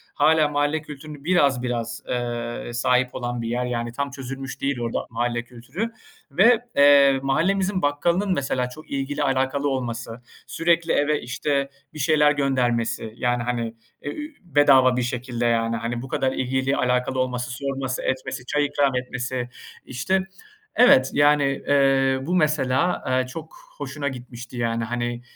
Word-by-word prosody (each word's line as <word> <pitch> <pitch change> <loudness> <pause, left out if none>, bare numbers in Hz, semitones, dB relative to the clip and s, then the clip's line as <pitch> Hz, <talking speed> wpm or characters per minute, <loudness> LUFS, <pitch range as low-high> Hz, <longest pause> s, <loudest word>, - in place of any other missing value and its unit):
hâlâ 155 +1 +4
mahalle 145 +2 0
kültürünü 150 -1 -10
biraz 145 -7 +2
biraz, 115 -2 -3
eee, 120 -1 -3
sahip 125 +1 +1
olan 120 -1 -3
bir 115 - -4
yer. 120 +2 -1
Yani, 120 -1 -3
tam 140 +3 -3
çözülmüş 135 0 -7
değil 140 -2 -1
orada 115 -1 -2
mahalle 120 0 -1
kültürü 125 - -5 0.4
ve, 215 - +5 0.2
eee, 140 -1 +6
mahallemizin 185 +7 +1
bakkalının 170 +7 +1
mesela 130 -4 -1
çok 155 +5 -13
ilgili 140 +2 -2
alakalı 135 +1 +1
olması, 120 -3 -4 0.3
sürekli 170 0 +1
eve, 150 +1 +1
işte, 140 +3 -1 0.2
bir 155 - -9
şeyler 150 0 +4
göndermesi, 120 -6 0
yani, 120 -1 0
hani, 115 -2 -2 0.3
e 145 - -5
ü 300 - -7
bedava 135 -6 +4
bir - - +1
şekilde 120 0 -3
yani. 115 -1 +1
Hani, 120 +1 -3
bu 130 - -7
kadar 130 0 0
ilgili 130 +1 0
alakalı 125 +1 0
olması 125 -1 -2
sorması, 135 0 -3
etmesi, 130 -1 -3
çay 145 +2 +1
ikram 140 -2 +1
etmesi. 125 0 -3 0.4
İşte, 185 +10 -1 0.5
evet 130 - +6
yani, 145 0 +4 0.2
eee, 135 -1 +3
bu 170 +7 -1
mesela, 150 -1 +1
eee, 130 0 +1
çok 155 +5 -9 0.2
hoşuna 145 0 -4
gitmişti, 125 -2 -7
yani. 115 -1 -1
Hani, 120 +1 -3
130 Hz, 150 wpm, -23 LUFS, 120-145 Hz, 0.5 s, eee